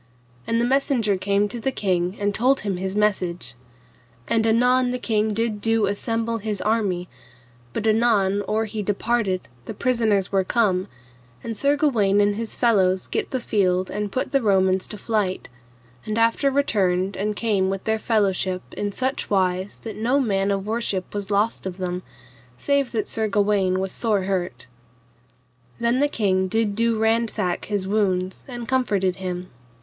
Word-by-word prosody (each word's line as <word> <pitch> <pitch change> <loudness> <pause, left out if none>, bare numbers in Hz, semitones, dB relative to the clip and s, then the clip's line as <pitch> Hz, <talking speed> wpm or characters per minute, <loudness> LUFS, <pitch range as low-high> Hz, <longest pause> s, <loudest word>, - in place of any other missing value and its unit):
And 230 - +1
the 235 - +2
messenger 250 -5 +2
came 200 +2 +1
to 235 - -4
the 265 +4 -1
king 185 -4 -1
and 205 0 0
told 260 +6 +2
him 195 -3 -2
his 190 +1 -3
message. 185 -8 0 0.7
And 225 -1 +2
anon 250 +3 +3
the 250 - -1
king 220 -3 0
did 215 -1 -1
do 225 -1 +2
assemble 225 +3 -1
his 210 -1 -3
army, 195 -5 0 0.6
but 210 - -3
anon, 215 -3 +3
or 220 +1 0
he 215 0 -4
departed 205 -1 0 0.2
the - - -6
prisoners 220 -6 +1
were 195 -1 +2
come, 190 -3 +1 0.6
and 230 - -4
Sir 280 +6 +2
Gawaine 215 -10 +2
and 205 0 +3
his 225 +1 -4
fellows 190 -6 +2
gat - - -2
the 260 - -2
field 185 -5 +1
and 210 -1 -3
put 255 - -2
the 275 -2 +2
Romans 190 -3 +2
to 210 - -8
flight, 205 - -1 0.5
and 215 +1 -3
after 230 +5 +3
returned 195 -9 +1
and 210 +2 -2
came 205 -4 +1
with 195 0 -3
their 220 0 0
fellowship 195 -4 0
in 205 0 -3
such 260 +6 -2
wise 185 -1 0
that 225 - -6
no 245 +6 +2
man 200 -6 +1
of 195 -1 -1
worship 215 -4 -2
was 205 -1 -4
lost 205 0 0
of 185 -1 -6
them, 180 -1 -3 0.6
save 280 - +1
that 220 -3 -1
Sir 220 -1 -1
Gawaine 200 -3 +2
was 190 0 -2
sore 210 -5 0
hurt. 180 -10 -2 1.1
Then 235 +2 +1
the 290 - +4
king 190 -8 +1
did 220 +1 0
do 230 +1 +1
ransack 220 -4 0
his 200 -3 -2
wounds 190 -3 0
and 240 -3 -7
comforted 200 -8 +1
him. 180 -1 -5
210 Hz, 165 wpm, -23 LUFS, 190-230 Hz, 1.1 s, the